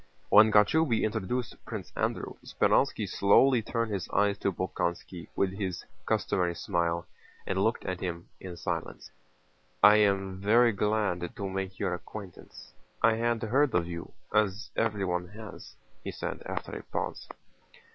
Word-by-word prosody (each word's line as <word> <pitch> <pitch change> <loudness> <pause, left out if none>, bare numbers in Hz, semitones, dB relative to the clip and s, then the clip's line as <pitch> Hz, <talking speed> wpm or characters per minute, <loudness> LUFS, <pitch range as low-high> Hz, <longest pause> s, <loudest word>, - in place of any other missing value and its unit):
When 110 +1 +7
Kochubéy 115 +5 +4
introduced 110 +3 -2
Prince - - -7
Andrew, - - -2
Speránski - - +1
slowly 120 +5 +4
turned 115 0 -2
his 95 -3 -3
eyes 100 0 +2
to 100 - 0
Bolkónski 85 -1 -3
with 95 -1 +1
his 95 -3 -4 0.2
customary 85 -1 +1
smile 85 0 -1 0.4
and 95 0 0
looked 110 +2 0
at 95 -1 -3
him 85 -2 -4
in 90 -2 -8
silence. - - -4 0.7
"I 105 +1 +9
am 95 -2 +1
very 115 +4 +5
glad 105 -2 -1
to 100 -4 -4
make 95 0 -4
your 90 - -1
acquaintance. 95 +1 -10 0.3
I 115 - +6
had 115 0 0
heard 130 +4 +2
of 85 -1 +2
you, 85 -1 -6 0.2
as 105 +1 +1
everyone 95 -5 0
has," 110 -2 -10 0.3
he - - -4
said - - -5
after - - -4
a - - -5
pause. - - -4
100 Hz, 145 wpm, -29 LUFS, 90-110 Hz, 0.7 s, I